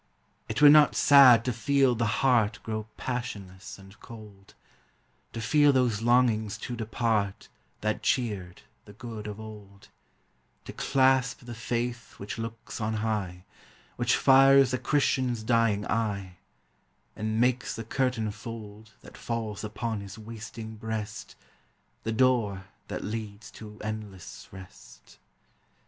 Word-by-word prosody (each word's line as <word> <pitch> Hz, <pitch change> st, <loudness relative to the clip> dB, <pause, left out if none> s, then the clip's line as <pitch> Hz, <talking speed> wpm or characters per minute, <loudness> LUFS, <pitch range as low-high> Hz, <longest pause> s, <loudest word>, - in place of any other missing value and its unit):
It -, -, -1 dB
were 145 Hz, -, +11 dB
not 150 Hz, 0 st, +6 dB
sad 130 Hz, -6 st, +7 dB
to 125 Hz, -, 0 dB
feel 135 Hz, +2 st, +2 dB
the 115 Hz, -1 st, 0 dB, 0.2 s
heart 115 Hz, -5 st, +3 dB
Grow 110 Hz, -1 st, -4 dB
passionless 100 Hz, -7 st, -6 dB
and 95 Hz, 0 st, -16 dB
cold; 105 Hz, -4 st, -13 dB, 0.8 s
To 115 Hz, -, -5 dB
feel 145 Hz, +6 st, +4 dB
those 125 Hz, -5 st, +1 dB
longings 115 Hz, -3 st, +2 dB
to 120 Hz, -, -6 dB
depart 110 Hz, -3 st, -2 dB, 0.3 s
That 110 Hz, 0 st, -1 dB
cheered 105 Hz, -8 st, -2 dB, 0.2 s
the 105 Hz, -, -13 dB
good 110 Hz, -1 st, -8 dB
of 105 Hz, 0 st, -7 dB
old; 105 Hz, -2 st, -12 dB, 0.8 s
To -, -, -8 dB
clasp 130 Hz, -2 st, +2 dB
the 120 Hz, -, -7 dB
faith 120 Hz, +1 st, -4 dB
which 100 Hz, +3 st, -7 dB
looks 115 Hz, 0 st, -7 dB
on 110 Hz, +1 st, -1 dB
high, 95 Hz, -5 st, -3 dB, 0.5 s
Which 120 Hz, 0 st, +1 dB
fires 135 Hz, -1 st, +6 dB
the 130 Hz, -, -1 dB
Christian's 130 Hz, -4 st, 0 dB
dying 115 Hz, -3 st, +1 dB
eye, 100 Hz, -5 st, -2 dB, 0.8 s
And 110 Hz, +1 st, -2 dB
makes 125 Hz, +1 st, +1 dB
the 115 Hz, -, -6 dB
curtain 115 Hz, -2 st, -1 dB
fold 110 Hz, 0 st, -10 dB
That -, -, -14 dB
falls 110 Hz, -3 st, -4 dB
upon 110 Hz, 0 st, -4 dB
his 100 Hz, +1 st, -10 dB
wasting 110 Hz, 0 st, -9 dB
breast, 110 Hz, -1 st, -6 dB, 0.7 s
The 110 Hz, -, -3 dB
door 110 Hz, -6 st, +1 dB, 0.2 s
that -, -, -5 dB
leads 105 Hz, 0 st, -6 dB
to 105 Hz, -1 st, -12 dB
endless 105 Hz, -4 st, -7 dB
rest. 95 Hz, -1 st, -14 dB
110 Hz, 130 wpm, -27 LUFS, 105-125 Hz, 0.8 s, were